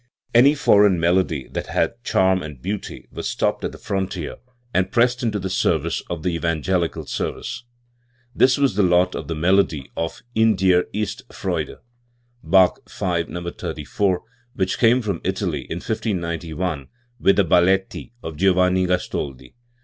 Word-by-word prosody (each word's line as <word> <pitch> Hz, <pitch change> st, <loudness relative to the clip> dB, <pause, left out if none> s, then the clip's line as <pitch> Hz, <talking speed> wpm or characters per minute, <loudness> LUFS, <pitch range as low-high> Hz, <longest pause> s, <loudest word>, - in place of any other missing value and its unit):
Any 135 Hz, +5 st, +6 dB
foreign 100 Hz, -, +4 dB
melody 85 Hz, -4 st, +1 dB
that -, -, -4 dB
had 120 Hz, +1 st, -1 dB
charm 95 Hz, -5 st, +2 dB
and 75 Hz, -5 st, -8 dB
beauty 100 Hz, +7 st, -5 dB
was -, -, -4 dB
stopped -, -, -1 dB
at -, -, -2 dB
the -, -, -11 dB
frontier 95 Hz, -4 st, -3 dB, 0.4 s
and 95 Hz, +1 st, +1 dB
pressed 125 Hz, +1 st, +2 dB
into 110 Hz, -4 st, 0 dB
the 95 Hz, -1 st, -3 dB
service 95 Hz, -, 0 dB
of 85 Hz, -3 st, -4 dB
the 90 Hz, -, +1 dB
evangelical 85 Hz, +1 st, -1 dB
service. 120 Hz, -, -4 dB, 0.7 s
This 130 Hz, -1 st, +4 dB
was 140 Hz, -4 st, +2 dB
the 105 Hz, -, +2 dB
lot 90 Hz, 0 st, +3 dB
of -, -, -5 dB
the 80 Hz, -, -3 dB
melody 85 Hz, -3 st, +1 dB
of 85 Hz, 0 st, -4 dB
"In 110 Hz, -1 st, +4 dB
dir 90 Hz, -1 st, +3 dB
ist 105 Hz, 0 st, -3 dB
Freude" -, -, -3 dB, 0.7 s
(Bach 95 Hz, -2 st, +4 dB
V, 85 Hz, -2 st, -1 dB
No. 85 Hz, 0 st, -6 dB
34), 90 Hz, +3 st, -2 dB, 0.3 s
which 95 Hz, -1 st, -1 dB
came 120 Hz, +1 st, +4 dB
from 100 Hz, -6 st, -2 dB
Italy 90 Hz, -7 st, -2 dB
in -, -, -3 dB
1591 85 Hz, -, -3 dB, 0.3 s
with 100 Hz, -, +4 dB
the 100 Hz, -, +3 dB
Balletti 95 Hz, +6 st, +2 dB
o 80 Hz, -, -4 dB
Giovanni 90 Hz, +2 st, +2 dB
Gastoldi. 70 Hz, -7 st, -3 dB
95 Hz, 150 wpm, -22 LUFS, 85-100 Hz, 0.7 s, Any